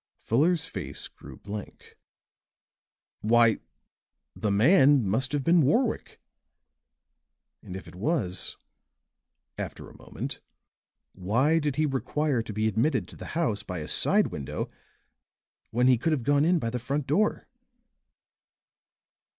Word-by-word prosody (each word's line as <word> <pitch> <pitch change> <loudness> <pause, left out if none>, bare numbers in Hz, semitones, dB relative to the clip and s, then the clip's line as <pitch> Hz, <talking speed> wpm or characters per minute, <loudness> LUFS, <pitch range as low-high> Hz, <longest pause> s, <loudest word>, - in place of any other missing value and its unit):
Fuller's 160 +7 +1
face 70 - -6
grew - - -13
blank. 105 0 -9 1.2
"Why, 115 0 +4 0.8
the 105 - -2
man 135 - +5
must 130 +7 0
have 145 -2 -1
been 170 +2 +5
Warwick! 220 - 0 1.4
And 90 - -9
if 95 - -8
it - - -12
was," 95 - -1 1.0
after - - -6
a - - -16
moment, - - -6 0.7
"why 120 - +2
did 145 -3 -1
he 155 - +2
require 145 -1 0
to 110 - -7
be 110 +1 0
admitted 110 - +1
to - - -12
the - - -9
house 115 -12 0
by 90 -3 -6
a 75 - -5
side - - +3
window 70 -3 -4 1.0
when 120 +2 +1
he 125 -2 +5
could 160 +5 +1
have 135 -6 -1
gone 145 +3 +3
in 175 +2 +4
by 115 -7 -2
the 125 - -2
front 140 +4 -2
door?" 205 +11 +1
130 Hz, 130 wpm, -27 LUFS, 105-150 Hz, 1.4 s, man